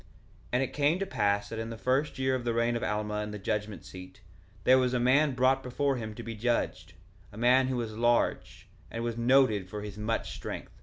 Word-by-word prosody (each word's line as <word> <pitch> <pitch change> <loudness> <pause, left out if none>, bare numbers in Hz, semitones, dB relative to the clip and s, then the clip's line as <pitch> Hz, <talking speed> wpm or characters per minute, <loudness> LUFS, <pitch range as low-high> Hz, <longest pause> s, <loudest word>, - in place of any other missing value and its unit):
1:2 - - -26 0.5
And 125 +2 +3
it 130 - -4
came 145 +4 +2
to 195 - -2
pass 100 - 0
that 115 - -5
in 115 0 -4
the 115 - -6
first 130 +6 0
year 130 0 +1
of 130 -2 -1
the 120 -1 -1
reign 115 0 +1
of 115 - -2
Alma 105 0 -1
in 105 - -4
the 105 - -6
judgment 105 +1 -3
seat, 95 +2 -11 0.4
there 130 +1 +6
was 125 -1 +1
a - - +2
man 135 +3 +3
brought 130 +2 +3
before 135 +2 -1
him 110 -2 -6
to 120 - -7
be 115 - -5
judged, 120 +2 -2 0.4
a 100 - -12
man 125 +3 +4
who 130 -1 -1
was 115 -3 -4
large, 120 +1 0 0.2
and 115 - -4
was 120 -1 -2
noted 120 -5 +3
for 105 0 -6
his 105 0 -8
much 115 +2 -2
strength. - - -7
120 Hz, 235 wpm, -29 LUFS, 105-130 Hz, 0.5 s, there